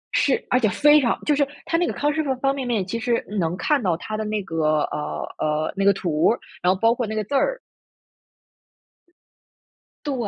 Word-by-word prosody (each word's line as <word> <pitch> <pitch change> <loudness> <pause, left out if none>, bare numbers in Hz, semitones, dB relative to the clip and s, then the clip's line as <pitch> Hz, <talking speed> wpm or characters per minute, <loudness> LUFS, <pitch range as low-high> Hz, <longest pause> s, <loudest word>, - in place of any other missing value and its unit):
是， 275 - +2
而 250 - +3
且 220 -4 +2
非 295 +9 +5
常 240 - 0
就 295 - +3
是 285 0 +2 0.2
它 330 - 0
那 345 0 +1
个 - - -1
康 295 +1 0
师 315 +1 0
傅 275 -3 0
方 270 +2 0
便 265 -3 -4
面， 220 -6 0
其 230 +5 -4
实 235 0 0 0.2
能 170 0 -1
看 295 +4 +1
到 180 -6 0
它 215 +5 -6
的 215 - -2
那 215 0 -2
个， 155 -4 0
呃 150 - -4
呃， 155 0 -1
那 195 - -1
个 200 - +6
图 170 -4 0
儿， 235 - 0 0.2
然 180 - +3
后 190 - -6
包 225 +2 +4
括 240 -1 -2
那 220 - -4
个 215 - -1
字 210 - -8
儿。 - - +1 2.5
对， 290 - -1
225 Hz, 235 characters per minute, -23 LUFS, 185-275 Hz, 2.5 s, 个